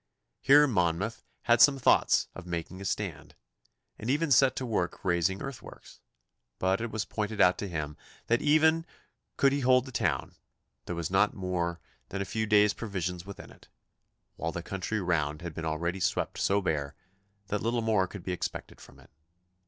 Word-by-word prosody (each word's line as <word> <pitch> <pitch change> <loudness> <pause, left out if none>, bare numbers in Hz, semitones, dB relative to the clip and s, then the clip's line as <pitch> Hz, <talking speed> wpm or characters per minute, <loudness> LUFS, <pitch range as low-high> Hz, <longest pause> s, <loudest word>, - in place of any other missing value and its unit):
Here 145 +2 +6
Monmouth 100 - 0 0.2
had 120 -1 +4
some 145 -1 +7
thoughts 130 - +3
of 90 -2 -10
making 85 +2 -5
a - - -6
stand, 90 -4 -4 0.6
and 110 - -5
even 150 +3 +1
set 135 0 +5
to 130 - -3
work 100 -6 -2
raising 90 +1 +1
earthworks, 135 -3 -10 0.6
but 95 +3 +1
it 115 - -3
was 110 -1 -3
pointed 105 -1 -4
out 90 0 +5
to 100 - -3
him 75 -4 -4 0.3
that, 120 +1 +1
even 160 +2 +4 0.5
could 140 - +4
he 140 - 0
hold 130 -1 +4
the 130 - -9
town, - - -1 0.5
there 90 - -3
was 85 +1 -3
not 95 +2 +3
more 90 -3 -2 0.3
than 100 - -4
a 100 - -2
few 110 +3 -2
days' 105 0 +5
provisions 90 -4 -4
within 100 - -10
it, - - -19 0.7
while 80 - -2
the 85 0 -5
country 95 +4 -3
round 75 -4 -1
had 85 -2 -5
been 80 +1 -5
already 85 +4 -2
swept - - -1
so 100 +1 +2
bare 75 -4 -2 0.5
that 105 0 -1
little 115 0 0
more 105 -4 +2
could 95 -1 -9
be 90 - -3
expected 90 - -6
from - - -16
it. - - -20
100 Hz, 180 wpm, -29 LUFS, 85-115 Hz, 0.7 s, some